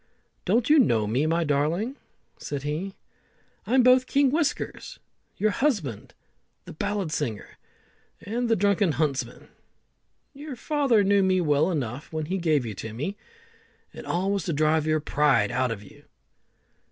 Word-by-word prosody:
"Don't 235 0 +2
you 305 0 +6
know 115 - +3
me, 125 +9 0
my 165 +1 +1
darling?" 160 - 0 0.4
said 145 -2 -5
he. 160 +7 -4 0.7
"I'm 255 +2 +4
both 255 +1 +5
King 280 -2 +3
Whiskers, 310 -1 -2 0.4
your 215 +1 +1
husband 200 - -2 0.5
the - - -9
ballad 200 0 -2
singer, 120 -9 -4 0.6
and 235 +3 -3
the 225 - +4
drunken 200 -3 +2
huntsman. 145 -1 -2 0.8
Your 285 -1 -8
father 270 -5 +2
knew 200 0 +3
me 190 -1 +2
well 155 0 +2
enough 135 -5 -4
when 155 -1 -3
he 190 +5 -2
gave 155 -7 +1
you 110 - -4
to 110 +3 -7
me, 155 - -3 0.8
and - - -10
all 185 +3 0
was 200 -1 -1
to 170 - -1
drive 155 +1 +2
your 155 0 +1
pride 150 -3 +2
out 130 +1 0
of 110 -3 -5
you." - - -17
170 Hz, 155 wpm, -25 LUFS, 145-215 Hz, 0.8 s, you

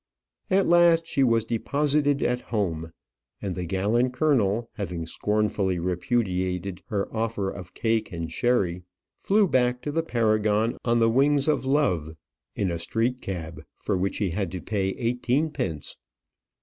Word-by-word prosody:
At 190 +1 +3
last 170 -1 +5
she 140 - +1
was 115 -3 +3
deposited 145 +4 +1
at 125 0 0
home; 85 -9 -2 0.5
and 95 -2 -3
the 90 0 -4
gallant 105 +8 +1
colonel, 120 -6 +2
having 90 -5 -4
scornfully 105 0 0
repudiated 90 0 -1
her 100 -3 -1
offer 110 -3 -1
of 90 -2 -10
cake 110 -1 0
and 85 -2 -5
sherry, 100 -8 +1 0.3
flew 205 0 +2
back 125 -4 +2
to 145 - -2
the 165 +2 +1
Paragon 110 -5 +1
on 120 -1 +2
the 115 -1 +4
wings 140 +3 +3
of 150 -3 +1
love 90 - +1 0.4
in 95 -3 0
a 85 - -3
street 120 +8 -1
cab, 85 -4 -5
for - - -2
which 95 +2 -1
he 100 -4 0
had 95 0 -2
to 90 - -3
pay 95 0 -1
eighteenpence. 125 - -1
110 Hz, 150 wpm, -26 LUFS, 95-125 Hz, 0.5 s, last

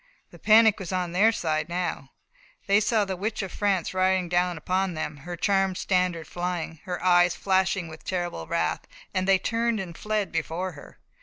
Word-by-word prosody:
The - - -14
panic 220 -1 +5
was 190 -2 -6
on 180 -2 -1
their 205 +6 +4
side 155 -6 -1
now. 175 -6 -3 0.6
They 200 +1 +4
saw 215 0 +2
the 190 -1 -3
Witch 210 +3 -3
of 190 - -6
France 195 -5 0
riding 185 -1 +1
down 175 0 +1
upon 185 +3 -1
them, 155 -1 -4
her 175 +5 -7
charmed 195 +1 +1
standard 180 -3 0
flying, 175 -2 -4
her 180 -1 -4
eyes 175 -1 +5
flashing 190 -2 +1
with 160 0 -11
terrible 175 - -3
wrath, - - -1 0.3
and 185 0 0
they 195 -1 +5
turned 230 +3 0
and 175 -3 -6
fled 210 0 -2
before 165 +3 -2
her. 145 -4 -14
185 Hz, 180 wpm, -26 LUFS, 175-195 Hz, 0.6 s, panic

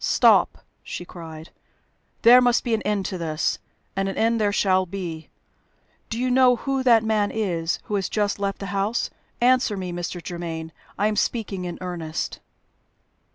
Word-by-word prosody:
"Stop!" - - +4 0.2
she 175 - -7
cried. 160 -2 -10 0.7
"There 245 +2 +9
must 245 -1 +3
be 235 - -1
an 220 - +1
end 205 -2 -1
to 185 - -4
this. 155 -2 -1 0.4
And 195 0 0
an 195 - -5
end 230 0 +2
there 205 -1 +2
shall 185 -2 +2
be. 170 -4 -6 0.8
Do 225 - -3
you 250 +1 0
know 255 -1 +5
who 270 +2 -2
that 235 -3 +5
man 215 -2 +1
is 175 -6 -1
who - - -7
has 195 -2 0
just 205 -1 0
left 200 0 -1
the 195 - -6
house? 200 +4 0 0.3
Answer 245 -4 +3
me, 185 -2 -4
Mr. 175 +1 -4
Germaine! 165 -2 -5 0.3
I 205 - +1
am 215 0 +1
speaking 205 -4 -1
in 175 - -5
earnest." 170 -3 -4
200 Hz, 170 wpm, -24 LUFS, 175-225 Hz, 0.8 s, There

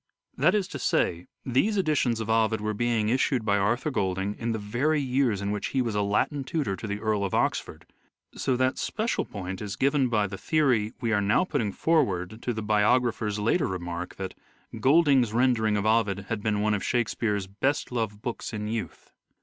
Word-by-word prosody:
That - - +3
is 200 -3 0
to - - -6
say, 85 0 0 0.2
these 135 - +1
editions 150 - +1
of 110 - -4
Ovid 110 0 +2
were 105 0 -2
being 115 -1 0
issued 130 -1 +1
by 100 -1 +2
Arthur 120 +9 0
Golding 95 -3 -1
in 115 +2 -3
the 110 - -1
very 120 +9 0
years 125 -6 0
in 100 - -1
which 105 -1 -2
he 135 - 0
was 115 -3 -3
Latin 105 +8 0
tutor 135 -7 -2
to 110 - -7
the 100 0 -3
Earl 105 -2 0
of 95 - -1
Oxford, - - -1 0.5
so 130 - 0
that 130 +1 +1
special 225 +1 -1
point 95 -2 -6
is 105 -1 -4
given 135 +2 +2
by 105 -3 +2
the 100 0 -6
theory 130 -9 +2
we 115 -2 0
are 105 - +2
now 105 - +3
putting 135 - -1
forward 110 - 0
to 125 - -2
the 110 -2 -4
bio 105 +3 +4
grapher's 110 -4 -2
later 115 +11 +1
remark 90 -1 -5
that 95 -1 -5 0.3
" 115 - -12
Golding's 135 -4 +4
rendering 115 -3 +2
of 100 - -1
Ovid 105 -3 +1
had 115 -2 -2
been 105 -1 0
one 105 0 +2
of 100 - -1
Shakespeare's 110 -4 0
best 125 +11 -1
loved 110 -3 -3
books 120 -1 -4
in 105 -1 -3
youth." 110 0 -5
110 Hz, 200 wpm, -27 LUFS, 105-130 Hz, 0.5 s, bio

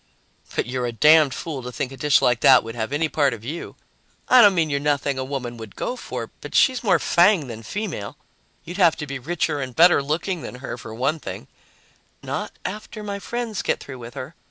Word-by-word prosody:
"But - - 0
you're 125 +1 -2
a - - -2
damned 150 +3 +5
fool 150 -5 -5
to 125 0 -7
think 130 +1 -4
a - - -8
dish 145 +2 +3
like 120 -1 +3
that 130 -1 +6
would 115 0 -7
have 110 +1 -4
any 155 +3 +1
part 140 -5 +1
of 115 0 -14
you. 160 +7 -6 0.5
I 255 - +8
don't 205 -3 +6
mean 160 -3 +1
you're 140 - +1
nothing 140 -2 0
a - - -1
woman 130 -3 -5
would 110 -3 -10
go 250 - -3
for, - - -6
but - - -8
she's 255 -2 +4
more 215 - +4
fang 175 -2 +3
than 115 -3 -8
female. 155 - -5 0.5
You'd 175 +4 -8
have 175 -5 +5
to 150 - -5
be 140 -2 -5
richer 155 +1 -1
and 130 -3 -6
better 175 -1 +6
looking 160 +5 -2
than - - -7
her, 130 -1 -6
for 110 -1 -9
one 140 +7 0
thing - - -7 0.4
" - - -33 0.3
"Not - - -4
after 215 +2 -6
my 200 -1 -4
friends 235 -1 -4
get - - 0
through 130 -2 -9
with 120 0 -10
her. 130 +5 -7
145 Hz, 230 wpm, -23 LUFS, 125-175 Hz, 0.5 s, I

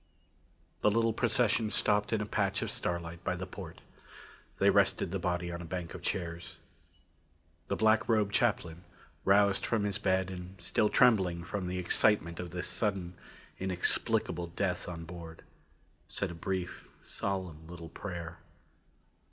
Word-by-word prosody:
The - - +5
little 115 +1 +2
procession 115 -1 +2
stopped 105 0 +2
in 110 -1 +1
a - - -1
patch 100 -2 0
of - - -2
starlight 85 0 -3
by - - 0
the - - -4
port. - - -9 0.8
They - - +5
rested - - +3
the 95 - -1
body 90 0 -1
on 85 0 -5
a - - -6
bank 85 0 -5
of 90 - -7
chairs. 85 -3 -3 1.1
The - - 0
black 110 +1 +3
robed 105 -3 +3
chaplain, 90 -7 +1 0.4
roused 100 0 +5
from 115 -3 +1
his 105 0 0
bed 95 -2 +1
and 90 +1 -8
still 105 - +2
trembling 95 -9 +4
from 90 0 -3
excitement 90 -1 +2
of 90 -1 -4
this 90 +1 -4
sudden, 95 -5 -1 0.5
inexplicable 90 -1 0
death 90 +2 -2
on 85 -2 -6
board, 85 -1 -9 0.7
said 100 -3 -2
a - - -6
brief, 90 +1 -4 0.2
solemn 90 -5 -4
little 85 -1 -9
prayer. 85 -3 -6
90 Hz, 145 wpm, -32 LUFS, 85-105 Hz, 1.1 s, The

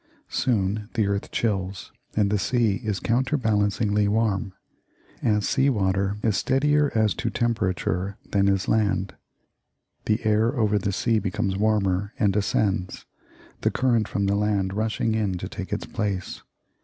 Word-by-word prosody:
Soon 105 -3 0
the 110 -3 +2
earth 100 0 -2
chills, 95 -4 -2 0.2
and 100 -2 +2
the 105 - +2
sea 110 -1 +1
is 105 -3 -1
counterbalancingly 110 -5 +1
warm 105 -1 0 0.7
as 105 -2 +1
sea 135 +1 +2
water 100 -3 0
is 110 -3 +2
steadier 145 +2 +2
as 110 -2 +3
to 115 - -2
temperature 100 -4 -1
than 100 -1 +3
is 95 -1 +1
land 100 -3 +1 0.9
the 110 +1 0
air 110 +4 +2
over 105 -4 +2
the 100 0 -1
sea 110 +3 +1
becomes 95 -1 -1
warmer, 100 -1 +1
and 100 -2 +2
ascends, 100 -2 0 0.6
the - - +2
current 120 -4 +1
from 100 - -1
the 100 - +2
land 100 -2 0
rushing 110 +1 0
in 105 -4 0
to - - -5
take - - -7
its - - -2
place. 100 -4 -3
105 Hz, 145 wpm, -25 LUFS, 100-110 Hz, 0.9 s, as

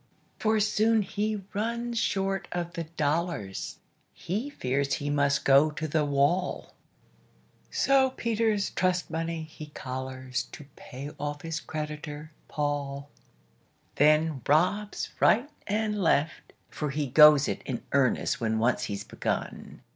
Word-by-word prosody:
For 220 0 +2
soon 215 +1 +3
he 210 +1 -2
runs 235 +2 -2
short 195 -1 -1
of 175 -1 -3
the 165 -1 -4
dollars, 155 - -2 0.4
He 215 - -3
fears 140 - -1
he 145 +2 -3
must 140 -1 +1
go 140 +3 +6
to 155 +1 -4
the 155 0 +1
wall; 145 +6 0 1.0
So 270 -1 +3
Peter's 225 -4 0
trust 185 -2 0
money 165 0 -2
he 155 -1 -10
collars 130 -2 -5
To 145 - -9
pay 140 +3 -8
off 145 0 -4
his 165 0 -3
creditor, 150 0 -6 0.2
Paul; 145 -1 -3 0.8
Then 155 -1 +3
robs 190 +7 +1
right 245 +9 +4 0.2
and 210 0 0
left 160 -2 +1 0.2
for 150 - -3
he 150 +1 -1
goes 150 +1 +7
it - - -3
In 120 -3 -4
earnest 135 -4 +1
when 110 -1 0
once 115 +2 +1
he's 100 -2 -4
begun. - - -4
155 Hz, 130 wpm, -28 LUFS, 140-200 Hz, 1.0 s, goes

